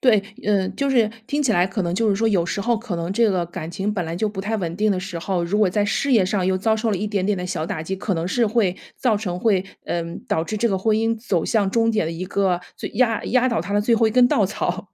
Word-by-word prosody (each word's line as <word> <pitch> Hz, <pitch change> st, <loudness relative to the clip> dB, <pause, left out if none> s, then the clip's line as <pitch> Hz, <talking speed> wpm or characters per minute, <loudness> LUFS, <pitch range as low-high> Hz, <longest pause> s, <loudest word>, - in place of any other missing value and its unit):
对， 220 Hz, -6 st, +4 dB, 0.2 s
嗯， 195 Hz, -2 st, +1 dB
就 280 Hz, -, 0 dB
是 235 Hz, -5 st, +3 dB, 0.2 s
听 295 Hz, +1 st, 0 dB
起 255 Hz, -5 st, +2 dB
来， 175 Hz, -2 st, +3 dB
可 190 Hz, +1 st, -3 dB
能 175 Hz, 0 st, -1 dB
就 225 Hz, +3 st, +1 dB
是 200 Hz, -, +3 dB
说 225 Hz, +3 st, +1 dB
有 190 Hz, -6 st, +2 dB
时 200 Hz, -, -2 dB
候 235 Hz, +3 st, +1 dB
可 225 Hz, -4 st, -5 dB
能 170 Hz, +2 st, -3 dB
这 230 Hz, +2 st, +3 dB
个 185 Hz, -3 st, 0 dB
感 170 Hz, -2 st, -7 dB
情 195 Hz, +4 st, -2 dB
本 185 Hz, -4 st, -2 dB
来 165 Hz, +1 st, -4 dB
就 215 Hz, +5 st, 0 dB
不 205 Hz, -2 st, -5 dB
太 215 Hz, +3 st, -2 dB
稳 170 Hz, -4 st, -3 dB
定 210 Hz, +1 st, +2 dB
的 185 Hz, -, -2 dB
时 185 Hz, -2 st, -5 dB
候， 180 Hz, +1 st, -1 dB
如 180 Hz, +5 st, 0 dB
果 210 Hz, -3 st, +4 dB
在 205 Hz, +3 st, +1 dB
事 260 Hz, +6 st, 0 dB
业 210 Hz, -6 st, +5 dB
上 190 Hz, -2 st, 0 dB
又 190 Hz, 0 st, +2 dB
遭 220 Hz, +3 st, +1 dB
受 220 Hz, +1 st, -1 dB
了 205 Hz, -, 0 dB
一 205 Hz, +4 st, -2 dB
点 200 Hz, -3 st, -1 dB
点 205 Hz, -1 st, +1 dB
的 180 Hz, -, -4 dB
小 160 Hz, -3 st, -3 dB
打 155 Hz, -, -4 dB
击， 190 Hz, +4 st, -4 dB
可 195 Hz, +1 st, -2 dB
能 165 Hz, 0 st, -2 dB
是 230 Hz, +6 st, +1 dB
会 205 Hz, -4 st, +1 dB, 0.2 s
造 235 Hz, -5 st, +2 dB
成， 185 Hz, -4 st, -3 dB
会 195 Hz, -3 st, +2 dB, 0.2 s
嗯， 170 Hz, -1 st, -3 dB
导 160 Hz, -, +1 dB
致 215 Hz, -, -4 dB
这 235 Hz, +3 st, +1 dB
个 195 Hz, -3 st, 0 dB
婚 215 Hz, +3 st, +2 dB
姻 225 Hz, +1 st, +1 dB
走 195 Hz, -7 st, -1 dB
向 210 Hz, -4 st, +1 dB
终 230 Hz, +1 st, +2 dB
点 215 Hz, -7 st, 0 dB
的 165 Hz, -, -3 dB
一 175 Hz, +3 st, -5 dB
个 190 Hz, -2 st, +1 dB, 0.2 s
最 -, -, -5 dB
压 230 Hz, 0 st, +1 dB
压 255 Hz, +1 st, +2 dB
倒 230 Hz, -6 st, 0 dB
他 180 Hz, +5 st, -5 dB
的 205 Hz, -, +3 dB
最 230 Hz, +3 st, +3 dB
后 225 Hz, 0 st, +3 dB
一 -, -, +1 dB
根 245 Hz, +2 st, +5 dB
稻 210 Hz, -5 st, +3 dB
草， 190 Hz, 0 st, -3 dB
200 Hz, 325 characters per minute, -22 LUFS, 180-225 Hz, 0.2 s, 业